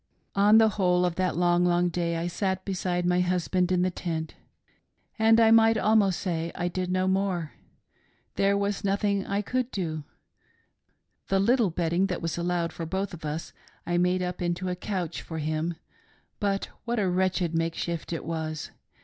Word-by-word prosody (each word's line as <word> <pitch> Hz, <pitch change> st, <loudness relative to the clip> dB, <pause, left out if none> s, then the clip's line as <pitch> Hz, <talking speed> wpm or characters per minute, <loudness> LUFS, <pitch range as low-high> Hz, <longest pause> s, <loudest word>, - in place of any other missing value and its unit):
" -, -, -45 dB
The 215 Hz, +2 st, +6 dB
whole 180 Hz, -2 st, +3 dB
gi 175 Hz, -, -2 dB
that 185 Hz, -2 st, 0 dB
long, 175 Hz, 0 st, +3 dB
long 175 Hz, 0 st, +2 dB
day 170 Hz, -1 st, -1 dB
I 165 Hz, -, -2 dB
sat 190 Hz, +1 st, -2 dB
beside 180 Hz, -2 st, -1 dB
my 180 Hz, 0 st, +2 dB
husband 180 Hz, 0 st, +1 dB
in 180 Hz, -1 st, +2 dB
the 185 Hz, -, +1 dB
tent 160 Hz, -3 st, -4 dB, 0.4 s
— -, -, -42 dB
and 225 Hz, +1 st, +5 dB
I 225 Hz, -1 st, +6 dB
might 225 Hz, 0 st, +6 dB
almost 210 Hz, -4 st, +3 dB
say 170 Hz, -3 st, -2 dB
I 175 Hz, -, -1 dB
did 180 Hz, +1 st, -3 dB
no 185 Hz, 0 st, +1 dB
more. 190 Hz, -4 st, 0 dB, 0.8 s
There 200 Hz, 0 st, +2 dB
was 200 Hz, +1 st, -1 dB
nothing 200 Hz, 0 st, +1 dB
that -, -, -9 dB
I 200 Hz, +1 st, 0 dB
could 255 Hz, +3 st, -1 dB
do. 160 Hz, -, -3 dB, 1.2 s
The 195 Hz, -, +2 dB
little 230 Hz, +1 st, +3 dB
bedding 170 Hz, +3 st, 0 dB
that 180 Hz, -, -3 dB
was 165 Hz, -1 st, -3 dB
al 170 Hz, -, -2 dB
lowed 175 Hz, -1 st, -1 dB
for 165 Hz, -, -5 dB
both 190 Hz, +3 st, -2 dB
of 160 Hz, -, -9 dB
us 150 Hz, +2 st, -4 dB, 0.3 s
I 175 Hz, 0 st, 0 dB
made 180 Hz, +1 st, +2 dB
up 180 Hz, 0 st, -4 dB
into 175 Hz, +1 st, -1 dB
a 180 Hz, -, -1 dB
couch 180 Hz, -3 st, -4 dB
for 160 Hz, -, -7 dB
him; 155 Hz, +2 st, -2 dB, 0.6 s
but 200 Hz, -1 st, -1 dB
what 235 Hz, 0 st, -2 dB
a 205 Hz, -3 st, +1 dB
wretched 180 Hz, -2 st, 0 dB
make 165 Hz, 0 st, 0 dB
shift 170 Hz, -1 st, -4 dB
it 165 Hz, -, -4 dB
was 155 Hz, -1 st, -4 dB
180 Hz, 190 wpm, -27 LUFS, 170-195 Hz, 1.2 s, The